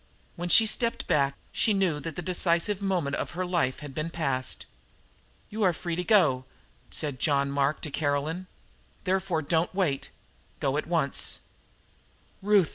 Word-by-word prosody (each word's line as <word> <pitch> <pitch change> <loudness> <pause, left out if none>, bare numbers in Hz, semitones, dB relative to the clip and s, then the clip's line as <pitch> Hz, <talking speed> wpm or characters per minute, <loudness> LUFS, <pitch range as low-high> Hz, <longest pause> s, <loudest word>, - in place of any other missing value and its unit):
When 175 +1 -4
she 225 - +8
stepped 230 +2 +1
back 140 -1 +2 0.2
she 215 - +2
knew 180 -6 +1
that 160 0 -6
the 175 - -4
decisive 180 +3 +2
moment 180 -8 0
of - - -4
her 185 - -1
life 170 -8 0
had 145 -2 -8
been 155 +4 -3
passed. 135 -6 -2 0.9
"You 215 +1 -4
are 185 -4 +4
free 170 0 -4
to 180 - -2
go," 165 - +3 0.4
said 145 -5 -3
John 140 -1 +2
Mark 140 +1 0
to 150 - -4
Caroline. 150 +5 -1 0.6
"Therefore 185 -4 0
don't 165 +4 0
wait. 160 -9 0 0.5
Go 135 -1 0
at 150 - -2
once." 165 -5 0 1.0
"Ruth!" 200 -4 +4
165 Hz, 155 wpm, -27 LUFS, 140-185 Hz, 1.0 s, she